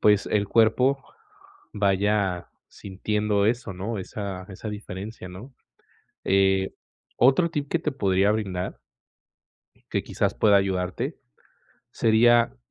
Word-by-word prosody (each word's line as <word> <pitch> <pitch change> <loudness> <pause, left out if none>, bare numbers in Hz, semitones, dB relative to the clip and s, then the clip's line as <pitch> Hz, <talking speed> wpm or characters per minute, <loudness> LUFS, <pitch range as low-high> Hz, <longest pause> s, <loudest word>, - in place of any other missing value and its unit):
pues, 105 -1 +4
el 100 -1 +1
cuerpo 125 +5 +3 0.7
vaya 100 -2 +1 0.2
sintiendo 105 +1 -1
eso, 115 -3 -1
¿no?, 100 +4 -4
esa 95 -1 -6
esa 100 +3 -7
diferencia, 105 -1 -7
¿no?, 100 +9 -11 0.7
eh, 95 0 +2 0.4
otro 135 +7 +4
tip 145 -2 -3
que 170 - +1
te 150 - -2
podría 100 -5 +2
brindar, 95 - -3 1.1
que - - 0
quizás - - -1
pueda 105 -2 +4
ayudarte, 95 -2 -1 0.7
sería 115 +1 +4
105 Hz, 110 wpm, -25 LUFS, 95-115 Hz, 1.1 s, pues